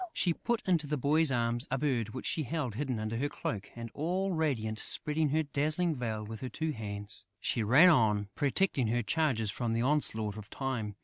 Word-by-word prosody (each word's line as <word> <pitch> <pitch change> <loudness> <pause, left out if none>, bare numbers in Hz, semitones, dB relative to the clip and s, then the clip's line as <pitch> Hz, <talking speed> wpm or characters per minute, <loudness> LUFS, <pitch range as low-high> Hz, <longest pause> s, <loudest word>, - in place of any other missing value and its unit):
She 175 - +2
put 235 +5 -2
into 165 -5 +2
the 150 +1 -1
boy's 150 +3 +3
arms 120 0 +1
a 135 - 0
bird 125 -6 0
which 130 +3 -7
she 160 - +1
held 150 -4 -2
hidden 130 -1 -2
under 110 +1 -3
her 145 +4 0
cloak 105 -7 -4
and, 115 -1 -7
all 185 +6 -1
radiant, 125 -10 -1
spreading 150 0 +1
her 160 +3 +2
dazzling 155 +4 0
veil 110 -4 -3
with 110 0 -8
her 130 - -4
two 160 +7 -2
hands, 105 -5 -6
she 115 - 0
ran 130 +12 +7
on, 105 - +3
protecting 145 - +1
her 120 +2 0
charges 125 -7 +1
from 120 -2 -2
the 115 +1 +1
onslaught 110 -7 +1
of 105 -1 -9
Time. 120 -7 -3
130 Hz, 200 wpm, -31 LUFS, 110-155 Hz, -, ran